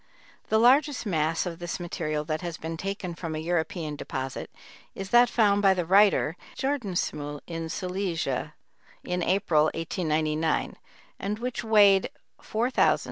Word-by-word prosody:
The 220 - +3
largest 260 +4 +4
mass 165 -3 0
of 170 -2 -5
this 175 +1 -4
material 155 -3 -3
that 155 +2 -2
has 170 -2 -5
been 165 +1 -5
taken 195 0 -4
from 165 -2 -5
a - - -3
European 160 -1 -2
deposit 130 -2 -5 0.5
is 195 0 -6
that 240 0 +6
found 205 -4 +3
by 195 -1 +5
the 180 -2 -1
writer 190 -3 +4 0.2
at - - -23
Jordansmühl 180 - -2
in 165 -1 -5
Silesia, 180 -7 -3 0.5
in 180 0 -2
April, 175 -5 +2
1899, 155 -1 -1 0.4
and 205 +2 -2
which 245 +1 -4
weighed 205 -3 +5 0.3
4704 235 +4 -1
pounds. - - +3
175 Hz, 145 wpm, -27 LUFS, 160-205 Hz, 0.5 s, that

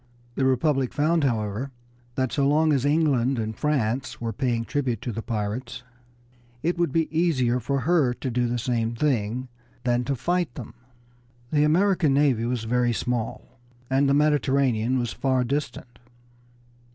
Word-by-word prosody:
The 130 - 0
Republic 130 0 +1
found, 155 +2 +2
however, 110 +1 -1 0.5
that 130 -2 0
so 140 -2 +1
long 155 +2 +3
as 135 -1 +1
England 140 -4 +2
and 110 -1 -3
France 130 -4 -1
were 115 -1 -3
paying 120 -4 -1
tribute 130 -6 -1
to 120 - -3
the 115 - -4
pirates 115 +3 -4 0.8
it 170 +3 +1
would 170 -5 +1
be 165 +2 +1
easier 130 -8 +2
for 135 +3 -1
her 155 -3 +3
to 130 - -4
do 120 +1 +1
the 120 +1 -1
same 115 -1 -1
thing 125 -2 -1 0.4
than 120 -1 +1
to 140 - -1
fight 175 0 -1
them. - - -8 0.8
The 150 -1 +3
American 175 -2 +3
Navy 135 -6 +2
was 120 -1 -2
very 120 +1 +1
small, 125 +1 -4 0.3
and 135 +1 +3
the 140 - +4
Mediterranean 135 -5 +2
was 120 -2 -2
far 130 -2 +1
distant. 125 -3 -4
130 Hz, 155 wpm, -25 LUFS, 120-145 Hz, 0.8 s, the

